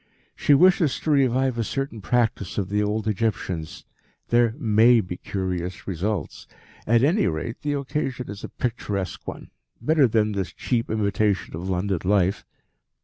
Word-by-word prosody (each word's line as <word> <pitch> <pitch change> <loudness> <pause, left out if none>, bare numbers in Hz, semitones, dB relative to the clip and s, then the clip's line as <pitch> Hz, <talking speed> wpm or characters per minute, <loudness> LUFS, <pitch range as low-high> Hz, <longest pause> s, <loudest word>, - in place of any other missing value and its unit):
She 145 - +4
wishes 175 -2 +4
to 155 - 0
revive 130 -3 +2
a - - +1
certain 135 -2 -4
practice 110 -2 0
of 95 -3 -1
the 105 +1 +1
old 105 +1 -1
Egyptians. 95 -6 -2 0.4
There 120 -1 +3
may 115 -2 +5
be 90 -4 -4
curious 90 -2 -4
results. 100 +2 -3 0.4
At 115 +2 +4
any 165 - +3
rate, 85 +7 -3
the 145 -1 -1
occasion 135 -2 -3
is 100 0 -8
a - - -5
picturesque 105 -6 -4
one - - -7 0.3
better 145 +2 +3
than 110 -1 +1
this 100 -2 -3
cheap 120 -2 -1
imitation 105 -3 0
of 90 +4 -5
London 95 0 0
life." 95 0 +2
110 Hz, 150 wpm, -24 LUFS, 95-125 Hz, 0.4 s, may